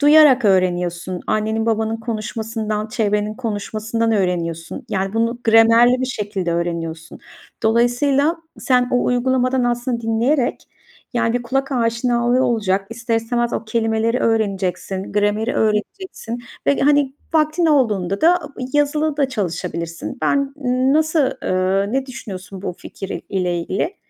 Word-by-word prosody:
Duyarak 290 Hz, -3 st, +6 dB
öğreniyorsun. 180 Hz, -2 st, +1 dB
Annenin, 220 Hz, +1 st, 0 dB
babanın 225 Hz, 0 st, 0 dB
konuşmasından, 220 Hz, -1 st, -3 dB
çevrenin 210 Hz, -2 st, 0 dB
konuşmasından 225 Hz, 0 st, -2 dB
öğreniyorsun. 175 Hz, -, -2 dB
Yani, 195 Hz, 0 st, -1 dB
bunu 230 Hz, +2 st, 0 dB
gramerli 230 Hz, +2 st, +5 dB
bir 260 Hz, -, 0 dB
şekilde 205 Hz, -7 st, -3 dB
öğreniyorsun. 165 Hz, -1 st, -4 dB, 0.4 s
Dolayısıyla 245 Hz, +7 st, +2 dB, 0.2 s
sen 250 Hz, -1 st, +2 dB
o 245 Hz, -, +2 dB
uygulamadan 255 Hz, +1 st, +1 dB
aslında 240 Hz, 0 st, -1 dB
dinleyerek, 235 Hz, +4 st, 0 dB, 0.5 s
yani, 230 Hz, -1 st, +1 dB
bir 245 Hz, -, 0 dB
kulak 270 Hz, +3 st, -1 dB
aşinalığı 240 Hz, +1 st, +1 dB
olacak, 200 Hz, -4 st, 0 dB
ister 230 Hz, 0 st, -1 dB
istemez 235 Hz, +1 st, -1 dB
o -, -, -2 dB
kelimeleri 225 Hz, +1 st, 0 dB
öğreneceksin, 195 Hz, -3 st, -1 dB
grameri 210 Hz, +3 st, +1 dB
öğreneceksin 225 Hz, -, -2 dB, 0.3 s
ve, 280 Hz, -, +3 dB
hani, 285 Hz, -1 st, +3 dB, 0.2 s
vaktin 310 Hz, +2 st, +2 dB
olduğunda 210 Hz, -, +1 dB
da 350 Hz, +2 st, +5 dB, 0.4 s
yazılı 295 Hz, +1 st, +1 dB
da 280 Hz, -2 st, +1 dB
çalışabilirsin. 170 Hz, -6 st, -4 dB
Ben 280 Hz, -, +1 dB, 0.4 s
nasıl, 315 Hz, -2 st, +2 dB
eee, 190 Hz, +3 st, 0 dB
ne 270 Hz, 0 st, 0 dB
düşünüyorsun 195 Hz, -6 st, -8 dB
bu -, -, -3 dB
fikir 195 Hz, -1 st, -7 dB
ile 180 Hz, -3 st, -1 dB
ilgili? 200 Hz, -, -2 dB
225 Hz, 120 wpm, -20 LUFS, 200-255 Hz, 0.5 s, Duyarak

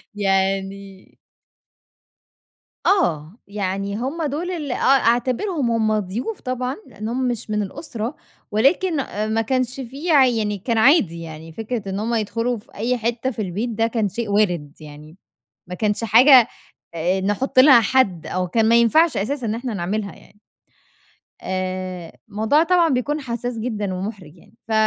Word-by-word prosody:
يعني 195 Hz, 0 st, -2 dB, 1.7 s
آه. 170 Hz, -, +1 dB
يعني 200 Hz, 0 st, -3 dB
هُم 275 Hz, +8 st, -3 dB
دُول 310 Hz, +6 st, -2 dB
اللي 295 Hz, -7 st, -3 dB
آه -, -, -3 dB
أعتبرهم 255 Hz, -, +2 dB
هُم 215 Hz, -1 st, +1 dB
ضيوف 230 Hz, -, -5 dB
طبعًا؛ 255 Hz, 0 st, -3 dB
لأن 215 Hz, +2 st, -7 dB
هم 255 Hz, +1 st, -1 dB
مش 235 Hz, -3 st, -4 dB
من 210 Hz, 0 st, 0 dB
الأسرة، 240 Hz, -, -5 dB, 0.4 s
ولكن 310 Hz, -, +2 dB, 0.4 s
ما 225 Hz, -, +2 dB
كانش 255 Hz, +2 st, -1 dB
فيه 275 Hz, +7 st, -3 dB
يعني 225 Hz, -7 st, +3 dB
كان 230 Hz, +4 st, -2 dB
عادي 220 Hz, -, +4 dB
يعني، 160 Hz, 0 st, -9 dB
فكرة 220 Hz, 0 st, -4 dB
إن 195 Hz, +1 st, -3 dB
هُم 230 Hz, +2 st, -1 dB
يدخلوا 230 Hz, +3 st, -1 dB
في 205 Hz, -, -17 dB
أي 240 Hz, +4 st, -1 dB
حتة 235 Hz, +3 st, -2 dB
في 220 Hz, -, -5 dB
البيت 205 Hz, +5 st, -3 dB
ده 225 Hz, 0 st, 0 dB
كان 225 Hz, -3 st, -1 dB
شيء 230 Hz, +1 st, -4 dB
وارد 175 Hz, -8 st, +1 dB
يعني، 150 Hz, +3 st, -12 dB, 0.5 s
ما 180 Hz, -, -5 dB
كانش 210 Hz, +2 st, -1 dB
حاجة، 240 Hz, +3 st, +7 dB, 0.5 s
آآ، 180 Hz, +4 st, 0 dB
نحط 255 Hz, +7 st, 0 dB
لها 260 Hz, -3 st, +8 dB
حد 205 Hz, -8 st, +1 dB
أو 185 Hz, 0 st, -2 dB
كان 220 Hz, +5 st, +1 dB
ما 230 Hz, -, +5 dB
ينفعش 290 Hz, +8 st, +4 dB
أساسًا 245 Hz, +5 st, -2 dB
إن 215 Hz, -, -1 dB
إحنا 240 Hz, -1 st, -4 dB
نعملها 200 Hz, +2 st, -3 dB
يعني. 205 Hz, -, -20 dB, 1.0 s
آآ 185 Hz, -2 st, -4 dB, 0.2 s
الموضوع 220 Hz, +9 st, +2 dB
طبعًا 345 Hz, -1 st, +3 dB
بيكون 290 Hz, +3 st, -1 dB
حساس 240 Hz, -2 st, -4 dB
جدًا 210 Hz, -5 st, -3 dB
ومُحرِج 185 Hz, -4 st, -7 dB
يعني -, -, -21 dB
ف -, -, -3 dB
225 Hz, 150 wpm, -21 LUFS, 195-255 Hz, 1.7 s, لها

